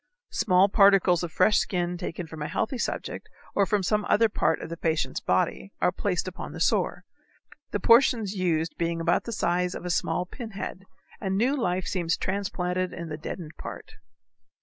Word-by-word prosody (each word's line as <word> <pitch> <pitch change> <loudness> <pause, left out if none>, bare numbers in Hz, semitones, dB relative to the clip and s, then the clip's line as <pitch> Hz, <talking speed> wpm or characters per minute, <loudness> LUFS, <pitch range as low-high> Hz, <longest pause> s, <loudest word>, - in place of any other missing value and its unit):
Small 185 -1 +4
particles 195 -4 +5
of 175 -2 -4
fresh 210 +6 +4
skin 175 -1 -1
taken 175 0 -5
from 160 -1 -9
a 150 - -2
healthy 245 +3 -2
subject - - -4 0.2
or 200 -1 +2
from 205 -2 +1
some 210 +3 +1
other 225 +1 +4
part - - +1
of - - -7
the 170 - -4
patient's 160 -5 -1
body 95 - 0
are - - +3
placed 185 0 -1
upon 185 - -6
the - - -7
sore, - - +1 0.7
the 205 - -2
portions 230 -2 +4
used 165 -4 0
being 170 0 0
about 170 +1 +1
the 235 - -4
size 180 -3 0
of - - -7
a 180 - -1
small 180 +1 0
pinhead, 195 -3 -7 0.3
and 190 -1 -1
new 250 +7 +2
life 185 -8 -1
seems 170 -3 0
transplanted 185 -2 -2
in 170 -1 -6
the 150 - -4
deadened 160 0 -7
part. - - -8
180 Hz, 180 wpm, -27 LUFS, 170-200 Hz, 0.7 s, particles